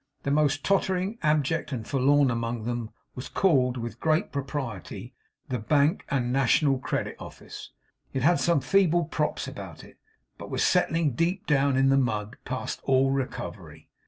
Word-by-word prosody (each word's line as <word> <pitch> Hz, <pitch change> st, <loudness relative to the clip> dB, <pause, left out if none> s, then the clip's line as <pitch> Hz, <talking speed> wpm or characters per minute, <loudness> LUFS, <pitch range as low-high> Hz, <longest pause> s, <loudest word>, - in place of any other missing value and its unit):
The 140 Hz, -, -1 dB
most 145 Hz, -1 st, +2 dB
tottering, 190 Hz, +2 st, 0 dB
abject, 155 Hz, 0 st, +1 dB
and 115 Hz, -5 st, -4 dB
forlorn 140 Hz, 0 st, +3 dB
among 115 Hz, -1 st, -3 dB
them 120 Hz, -1 st, -3 dB, 0.2 s
was 125 Hz, -, -7 dB
called, 130 Hz, -9 st, +2 dB
with 120 Hz, -1 st, -6 dB
great 155 Hz, 0 st, +1 dB
propriety, 135 Hz, -, -5 dB, 0.4 s
the 125 Hz, -, -2 dB
Bank, 145 Hz, -, +2 dB
and 125 Hz, -3 st, 0 dB
National 135 Hz, +1 st, +3 dB
Credit -, -, -3 dB
Office. -, -, -10 dB, 0.4 s
It 130 Hz, -, -2 dB
had 170 Hz, +4 st, +4 dB
some 170 Hz, -5 st, +2 dB
feeble 175 Hz, +3 st, +3 dB
props 150 Hz, 0 st, -2 dB
about -, -, -9 dB
it, -, -, -17 dB, 0.4 s
but -, -, -8 dB
was -, -, 0 dB
settling 165 Hz, -3 st, +2 dB
deep 175 Hz, -, -1 dB
down 140 Hz, -4 st, +2 dB
in 135 Hz, 0 st, +4 dB
the 135 Hz, -, +4 dB
mud, 110 Hz, -3 st, -2 dB
past 130 Hz, 0 st, -4 dB
all 135 Hz, 0 st, +3 dB
recovery. 135 Hz, -1 st, -5 dB
140 Hz, 160 wpm, -27 LUFS, 125-155 Hz, 0.4 s, had